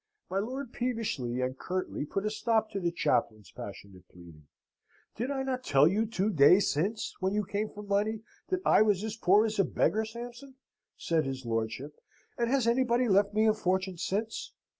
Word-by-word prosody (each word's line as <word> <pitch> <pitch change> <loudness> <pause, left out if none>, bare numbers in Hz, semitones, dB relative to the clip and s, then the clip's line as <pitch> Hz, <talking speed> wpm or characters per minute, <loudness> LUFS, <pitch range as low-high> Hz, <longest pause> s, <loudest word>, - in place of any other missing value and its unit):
My 190 - +1
lord 255 +4 -5
peevishly 210 - -2
and 130 +1 -1
curtly 185 -5 -3
put 195 +5 -2
a 215 - 0
stop 220 0 0
to 200 - -3
the 175 -2 0
chaplain's 110 - -1
passionate 95 -2 -10
pleading. 85 -4 -15 0.7
"Did 245 +4 -3
I 270 -1 -1
not 255 -1 -3
tell 140 - +5
you, 210 +6 +1
two 210 -1 0
days 175 +5 +5
since, 195 +9 -2
when 190 +2 0
you 210 -1 0
came 210 +3 -2
for 210 - -10
money, 210 +2 0 0.3
that 370 -1 0
I - - +5
was 210 -2 +3
as 220 0 -3
poor 210 0 +4
as 215 -2 -3
a - - +6
beggar, 220 +3 +1
Sampson," 240 +4 -9 0.4
said 160 -2 0
his 130 -1 -5
lordship, 115 +6 -3 0.3
"and 235 -1 0
has 265 -2 +2
anybody 245 +1 +2
left 200 0 +3
me 215 +1 +4
a 215 - +5
fortune 185 -3 -1
since? 215 +6 -3
205 Hz, 185 wpm, -30 LUFS, 160-225 Hz, 0.7 s, a